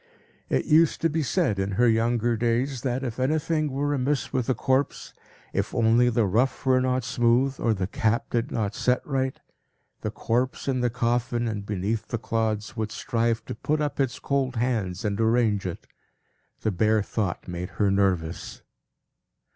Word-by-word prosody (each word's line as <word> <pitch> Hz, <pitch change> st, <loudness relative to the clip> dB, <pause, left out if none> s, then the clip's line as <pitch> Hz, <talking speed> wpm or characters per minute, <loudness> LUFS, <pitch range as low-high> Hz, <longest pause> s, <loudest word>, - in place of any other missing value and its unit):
It -, -, +1 dB
used 160 Hz, 0 st, +4 dB
to 165 Hz, -, +2 dB
be 160 Hz, +1 st, 0 dB
said, 110 Hz, -6 st, +1 dB
in 95 Hz, +1 st, -1 dB
her 120 Hz, +5 st, +3 dB
younger 115 Hz, +1 st, +2 dB
days, 120 Hz, +3 st, 0 dB
that, 130 Hz, 0 st, -1 dB
if 120 Hz, -2 st, -4 dB
anything 155 Hz, +3 st, +1 dB
were 145 Hz, +2 st, 0 dB
amiss 140 Hz, +1 st, -1 dB
with 130 Hz, -1 st, 0 dB
a 130 Hz, -, +2 dB
corpse, 130 Hz, +4 st, 0 dB, 0.4 s
if -, -, -2 dB
only 115 Hz, +2 st, +4 dB
the 115 Hz, -2 st, +2 dB
ruff 120 Hz, +9 st, +1 dB
were 130 Hz, -1 st, +4 dB
not 130 Hz, 0 st, 0 dB
smooth, 120 Hz, +3 st, +2 dB
or 115 Hz, -2 st, +1 dB
the 95 Hz, -1 st, -1 dB
cap 115 Hz, +4 st, 0 dB
did 120 Hz, -1 st, 0 dB
not 105 Hz, -2 st, -1 dB
set 125 Hz, +2 st, 0 dB
right, 130 Hz, -2 st, -1 dB, 0.6 s
the -, -, -3 dB
corpse, 125 Hz, +4 st, -1 dB
in 130 Hz, -2 st, +1 dB
the 120 Hz, 0 st, +2 dB
coffin 120 Hz, 0 st, 0 dB
and 105 Hz, -2 st, -4 dB
beneath 105 Hz, +2 st, -2 dB
the 115 Hz, -, -2 dB
clods, 110 Hz, -1 st, -2 dB
would 110 Hz, -2 st, -3 dB
strive 115 Hz, -1 st, -1 dB
to -, -, -5 dB
put 150 Hz, +7 st, -1 dB
up 150 Hz, -1 st, -2 dB
its 135 Hz, -3 st, 0 dB
cold 135 Hz, -2 st, -1 dB
hands 115 Hz, -5 st, -1 dB
and 105 Hz, +1 st, 0 dB
arrange 110 Hz, -4 st, +2 dB
it. 90 Hz, -, -6 dB, 0.8 s
The 110 Hz, -, 0 dB
bare 110 Hz, +3 st, +2 dB
thought 100 Hz, -4 st, -3 dB
made 90 Hz, +1 st, -4 dB
her 100 Hz, -2 st, +3 dB
nervous. 95 Hz, -5 st, -1 dB
120 Hz, 175 wpm, -26 LUFS, 110-130 Hz, 0.8 s, used